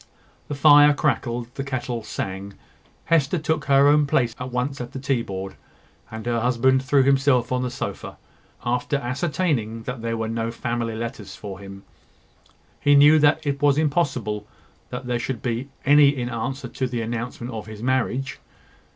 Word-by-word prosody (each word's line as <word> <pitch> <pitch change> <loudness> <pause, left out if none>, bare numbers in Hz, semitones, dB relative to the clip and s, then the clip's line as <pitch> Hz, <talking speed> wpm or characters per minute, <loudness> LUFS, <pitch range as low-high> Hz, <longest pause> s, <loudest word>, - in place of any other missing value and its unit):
The 145 - -4
fire 145 0 +7
crackled, 120 -3 -1
the 135 - -4
kettle 125 -3 -3
sang, 100 -1 -5 0.5
Hester 165 -1 +2
took 155 -1 -1
her 140 0 +5
own 145 0 +4
place 120 -4 +1
at 125 0 -5
once 125 +2 -2
at 120 - -7
the 135 - -5
tea 130 -2 0
board, 95 -3 -6 0.5
and 110 0 -8
her 120 -1 0
husband 125 +2 +2
threw 135 0 +3
himself 135 -2 +3
on 125 0 +1
the 125 - -1
sofa, 120 - -6 0.5
after 125 +4 0
ascertaining 130 -4 -1
that 125 0 -5
there 115 0 -2
were 110 0 -2
no 115 0 -2
family 115 -1 -3
letters 115 -4 -6
for 100 -2 -8
him. 100 0 -10 1.0
He 145 0 +4
knew 150 +2 +7
that 150 +1 +3
it 140 -1 -2
was 145 -1 +4
impossible 135 -9 0 0.4
that 125 +1 -6
there 120 -1 -1
should 120 -1 -4
be 120 +2 -2 0.2
any 145 +1 +7
in 125 -4 -2
answer 130 +3 -4
to 130 +2 -3
the 120 -2 -3
announcement 120 +1 -5
of 110 -1 -6
his 110 0 -9
marriage. 130 +1 -1
125 Hz, 170 wpm, -23 LUFS, 115-140 Hz, 1.0 s, fire